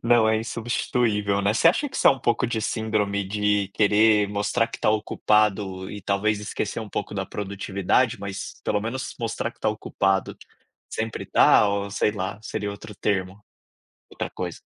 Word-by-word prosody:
Não 115 -1 +4
é 110 - +3
insubstituível, 110 -2 0
né. 100 - +2
Você 110 - +3
acha 290 - +1
que - - -7
isso - - +2
é - - +10
um 135 - 0
pouco 120 +2 +1
de 115 -1 -2
síndrome 105 -3 -1
de 105 -1 +1
querer 105 0 +4
mostrar 105 +3 0
que - - -8
tá - - +1
ocupado 105 -3 +1
e 105 - -7
talvez 100 +2 0
esquecer 105 +1 -3
um 110 - -7
pouco 105 - -4
da 95 -1 -2
produtividade, 100 +3 0
mas 100 -1 -6
pelo 105 - +1
menos 130 +5 -4
mostrar 115 0 -2
que - - -26
tá - - +1
ocupado, 95 -2 -1 0.5
sempre 110 0 -3
está 105 - +5
ou 100 0 -2
sei 105 +1 +1
lá, 100 0 -4
seria 105 -2 -3
outro 100 +1 -9
termo, 95 0 -2 0.7
outra - - -4
coisa? - - -5
105 Hz, 175 wpm, -24 LUFS, 100-110 Hz, 0.7 s, é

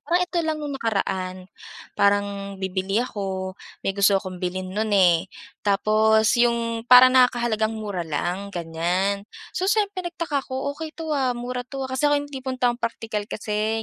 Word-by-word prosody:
Parang 350 +1 +1
ito 355 0 -7
lang 315 -1 -1
no'ng 295 -2 -5
nakaraan, 190 -4 -1 0.6
parang 200 -1 0
bibili 190 +1 -2
ako, 190 -4 -4 0.3
may 195 - +1
gusto 200 0 +4
akong 185 -2 -5
bilhin 185 +1 -3
nun, 215 +2 -1
eh. 180 -1 +4 0.3
Tapos 215 +2 +3
'yung 235 -1 0
parang 255 +1 +9
nakakahalagang 235 -3 +2
mura 205 -4 -4
lang, 175 +6 -2
ganiyan. 180 +4 -1 0.2
So 375 - -1
siyempre, 405 -2 +1
nagtaka 325 -5 -2
ako. 265 +2 -4
"Okey 315 +1 -8
'to, 320 -2 -4
ah, 260 -4 +1
mura 250 +1 -4
'to, 270 0 -4
ah," 260 - -6
kasi 290 +3 +2
ako 290 - +3
'yung 285 0 -4
tipong 260 -1 -4
taong 245 -1 +1
praktikal 225 -2 -3
kasi 215 +1 -2
220 Hz, 165 wpm, -24 LUFS, 195-260 Hz, 0.6 s, parang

